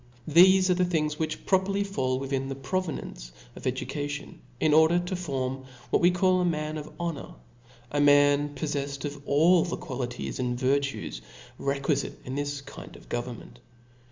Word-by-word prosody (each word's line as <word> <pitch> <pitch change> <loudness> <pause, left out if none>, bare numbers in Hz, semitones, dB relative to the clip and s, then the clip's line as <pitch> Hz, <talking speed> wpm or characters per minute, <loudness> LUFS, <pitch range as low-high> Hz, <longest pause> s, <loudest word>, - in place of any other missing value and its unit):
Thcfe 185 +4 +7
are 185 - +4
the 180 +1 +1
things 155 -4 -1
which 160 - -3
properly 195 +1 +2
fall 130 -10 -1
within 135 0 -2
the 135 - -3
province 135 - -4 0.2
of - - -10
education^ 145 -1 -3 0.2
in 155 +1 +3
order 160 +2 +6
to 175 +1 -2
form 135 -6 -3 0.3
what - - +3
^we 175 +1 +6
call 185 0 +3
a - - +2
man 155 -2 -1
of 150 - -9
honor, 170 -4 -4 0.6
a 145 - +1
man 145 0 +4
poflcffed 140 -1 -3
of 145 -1 -5
all 165 +4 +5
the 175 - -3
qualities 125 -3 -5
and 125 -1 -1
virtues 140 +2 -1 0.4
requifite 140 0 -1
in 130 - -5
this 145 0 -3
kind 140 - -11
of - - -16
go 120 - -1
vernment. 120 -1 -10
145 Hz, 165 wpm, -27 LUFS, 135-175 Hz, 0.6 s, Thcfe